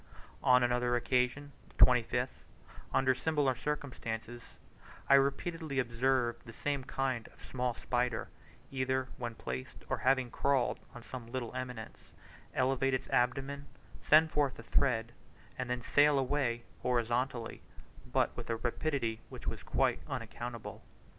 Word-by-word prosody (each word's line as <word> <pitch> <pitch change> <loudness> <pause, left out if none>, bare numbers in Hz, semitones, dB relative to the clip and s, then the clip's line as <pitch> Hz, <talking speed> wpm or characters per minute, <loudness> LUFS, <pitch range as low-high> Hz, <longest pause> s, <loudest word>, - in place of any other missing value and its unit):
On 125 -1 +6
another 120 0 +2
occasion 125 +4 +1 0.3
(25th) 125 +1 +4 0.5
under 130 0 +4
similar 145 0 +1
circumstances, 120 -4 -4 0.7
I - - +6
repeatedly 140 +2 +2
observed 120 -1 +1
the 115 - -11
same 140 +1 -2
kind 130 -4 -1
of - - -16
small 125 -2 -1
spider, 125 -2 -1 0.4
either 130 -1 0
when 120 -2 -4
placed 65 -7 -6
or - - 0
having 130 -2 +2
crawled 140 -3 +1 0.2
on 120 - -9
some 120 -2 -8
little 125 -3 -3
eminence, 125 -3 -7 0.4
elevate 135 0 +2
its 130 - -4
abdomen, 135 +3 0 0.3
send 160 +1 +6
forth 145 -3 +1
a 115 - -9
thread, 115 -2 +1 0.4
and 130 -1 -4
then 125 -1 -1
sail 145 +2 +5
away 130 -3 0 0.2
horizontally, 120 0 0 0.5
but - - +2
with - - -7
a 115 - +1
rapidity 120 -1 -1
which - - -9
was - - -3
quite - - +1
unaccountable. - - -5
125 Hz, 130 wpm, -33 LUFS, 120-135 Hz, 0.7 s, On